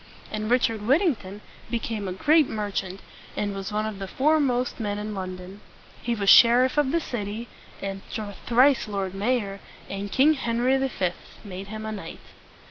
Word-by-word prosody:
And 215 0 -3
Richard 230 -3 +2
Whittington 235 - +1 0.3
became 225 -3 -3
a - - -3
great 295 - +3
merchant, 195 -3 -3 0.4
and 205 -1 -1
was 195 +1 -5
one 215 +1 -1
of 215 -2 -5
the 195 - -5
foremost 265 - +1
men 205 -2 -2
in 210 +1 -4
London. 185 +1 -7 0.4
He 235 0 -1
was 200 -3 -3
sheriff 245 +5 +7
of 295 -3 +2
the 335 - +2
city, 225 -4 -5 0.4
and 195 0 -4 0.5
thrice 250 +1 +4
lord 195 -3 -3
mayor; 200 -1 -1 0.3
and 195 0 -4
King 290 +4 +5
Henry 245 -1 +1
V. 260 -9 0 0.3
made 195 0 -7
him 215 +1 -6
a 220 - -3
knight. 210 -2 -7
215 Hz, 160 wpm, -25 LUFS, 195-250 Hz, 0.5 s, sheriff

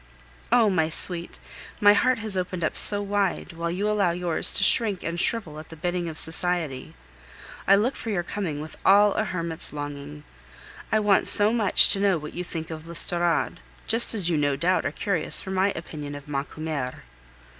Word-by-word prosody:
Oh! 235 -2 +4
my 165 -5 0
sweet, 170 +1 0 0.4
my 205 0 +6
heart 255 +4 +1
has 215 -3 -1
opened 180 -1 -4
up 155 - -2
so 205 0 +7
wide, 200 -3 -2
while 170 0 -4
you 190 +5 -3
allow 210 -4 +1
yours 170 -1 +1
to - - +1
shrink 210 -5 +3
and 170 +1 -4
shrivel 175 -8 -1
at 155 - -13
the 165 - -11
bidding 175 +1 -3
of 160 - -9
society! 160 -5 -2 0.7
I 195 - +6
look 225 +7 0
for 230 - -7
your 185 -5 -2
coming 170 -6 -5
with 155 0 -10
all 205 +1 +4
a 215 - -1
hermit's 170 -4 -5
longing. 145 0 -8 0.7
I 220 - +2
want 205 -2 +2
so 210 +2 +5
much 220 -5 +5
to 195 - +4
know 195 -3 +1
what 150 -1 -9
you 180 - -5
think 165 -2 -7
of 160 0 -9
l'Estorade, 170 -1 0 0.3
just 230 0 +2
as 195 -6 +1
you 170 -3 0
no 145 -1 0
doubt 175 +4 0
are - - -4
curious 175 +1 0
for 190 - -7
my 190 +1 +1
opinion 150 -3 -8
of 145 +1 -11
Macumer. 145 -1 -5
175 Hz, 190 wpm, -24 LUFS, 160-205 Hz, 0.7 s, so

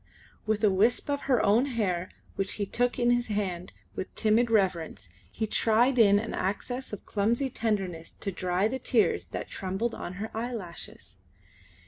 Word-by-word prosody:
With 215 0 0
a 210 - +5
wisp 220 +9 +2
of 285 - -1
her 250 -3 +4
own 220 +6 +4
hair 185 -5 0 0.3
which 195 0 -1
he 205 - -2
took 245 +5 0
in 240 -1 +3
his 240 0 +1
hand 190 -4 -2 0.2
with - - -5
timid 225 +2 +3
reverence 180 - 0 0.2
he 220 - -2
tried 235 +4 +3
in 205 -3 +7
an 220 +2 -2
access 245 +7 -3
of 210 - -7
clumsy 235 +6 0
tenderness 195 -8 -2
to 195 - -5
dry 185 +2 0
the 260 +4 -3
tears 240 -3 +2
that - - -6
trembled 195 +5 -2
on 175 - -6
her 210 +4 -6
eyelashes. 225 -7 -6
215 Hz, 165 wpm, -28 LUFS, 190-235 Hz, 0.3 s, in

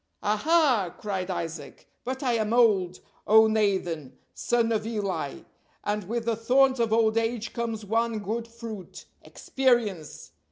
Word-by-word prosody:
"Aha!" 230 - +2
cried 195 -3 -4
Isaac, 165 -5 -6 0.2
"but 260 +3 -4
I 250 -2 +1
am 220 -1 0
old, 195 -7 +3 0.3
O 220 +1 +7
Nathan, 190 -10 -1 0.2
son 235 -1 0
of 215 -1 -1
Eli, 205 -4 -3 0.4
and 210 -1 -2
with 235 0 -2
the 230 -1 +1
thorns 260 +3 +3
of 230 -2 +1
old 225 0 +3
age 225 -1 -3
comes 230 -2 -4
one 225 +2 0
good 220 +3 -4
fruit, 230 -4 -9 0.2
'experience.' 235 - -1
220 Hz, 135 wpm, -26 LUFS, 205-235 Hz, 0.4 s, O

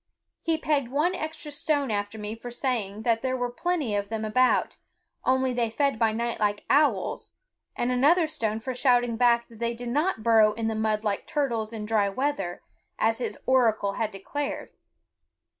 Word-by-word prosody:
He 325 -1 +1
pegged 295 -5 0
one 300 +8 +1
extra 310 -3 -5
stone 285 -3 0
after 205 +1 -2
me 210 0 -4
for 230 +2 -8
saying 225 -5 -2
that 230 -1 +2
there 260 0 -1
were 245 -1 -2
plenty 310 -4 -1
of 200 0 -2
them 220 -1 -3
about, 255 +4 +2 0.5
only 260 0 +2
they 240 -2 0
fed 275 +1 0
by 225 -2 +3
night 235 +2 -2
like 205 -1 0
owls, 295 +1 +1 0.4
and 240 +1 0
another 305 +7 +4
stone 225 -9 -2
for 255 +3 -4
shouting 245 -2 +2
back 235 0 +3
that 225 -2 -16
they 235 0 -1
did 240 +1 -6
not 295 - 0
burrow 220 -2 +5
in 225 +1 -2
the 225 - 0
mud 215 -1 0
like 205 -2 -2
turtles 235 -7 -1
in 220 -2 -5
dry 210 -2 +2
weather, 195 -6 -2 0.3
as 225 +1 +1
his 250 - -3
oracle 225 -6 +3
had 220 0 -1
declared. 275 +9 -5
235 Hz, 180 wpm, -26 LUFS, 220-270 Hz, 0.5 s, burrow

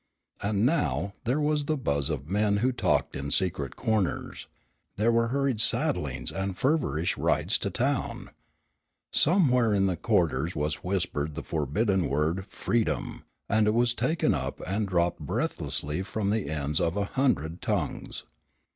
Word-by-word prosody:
And 100 +2 +1
now 100 - +1
there 125 +6 +1
was 150 -1 +1
the 155 +1 0
buzz 70 - -1
of 70 -2 -3
men 100 +2 +2
who 125 +5 +2
talked 120 - 0
in 70 +1 -4
secret 75 -4 0
corners. 110 -5 -1 0.5
There 110 +3 +2
were 115 0 +2
hurried 135 -3 +1
saddlings - - +1
and 95 -1 -3
feverish 130 - 0
rides - - +1
to - - -1
town. - - -1 0.8
Somewhere 125 - +4
in 95 -1 +3
the 95 -2 +1
quarters 85 - +1
was 75 0 -1
whispered 80 -5 -2
the - - -5
forbidden 95 - 0
word 80 +7 0
"freedom," 120 -2 -2 0.2
and 110 0 +3
it 105 - +2
was 120 0 +3
taken 160 +6 +1
up - - -3
and 100 +2 -1
dropped 85 -2 +1
breathlessly 75 +5 -2
from 100 +1 -2
the 105 -8 -1
ends 75 -1 -1
of 85 +3 0
a 100 - +1
hundred 100 - 0
tongues. - - -3
100 Hz, 150 wpm, -28 LUFS, 80-115 Hz, 0.8 s, Somewhere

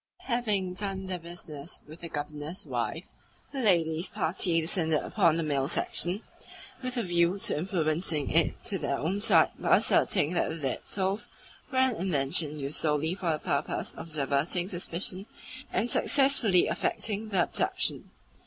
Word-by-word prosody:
Having 210 -7 0
done 195 0 -3
their 185 -1 -3
business 165 -4 -6
with 155 +2 -11
the 170 - -6
Governor's 150 +3 -4
wife, - - -3 0.5
the 275 - -3
ladies' 170 -5 +2
party 165 0 +1
descended 160 -2 0
upon 165 -1 +3
the 165 - 0
male 140 -3 0
section, 180 +6 -1 0.6
with 255 -1 -4
a 235 - +1
view 175 +1 +2
to - - +1
influencing 155 -2 0
it 165 +1 +2
to 195 - -2
their 140 - -1
own 185 +7 -1
side 180 -7 +5
by - - +5
asserting 150 +4 +2
that 175 - +1
the - - -3
dead 135 -5 -3
souls 195 +2 0 0.4
were 260 - -2
an 260 -2 +4
invention 150 -3 0
used 140 +1 -2
solely 155 +1 +1
for 185 -2 -2
the - - -1
purpose 140 -1 -2
of 165 - -9
diverting 150 +4 0
suspicion 185 +2 -2 0.4
and 240 - 0
successfully 265 -10 +4
affecting 215 0 -2
the 190 -4 +3
abduction. - - 0
175 Hz, 155 wpm, -29 LUFS, 155-195 Hz, 0.6 s, side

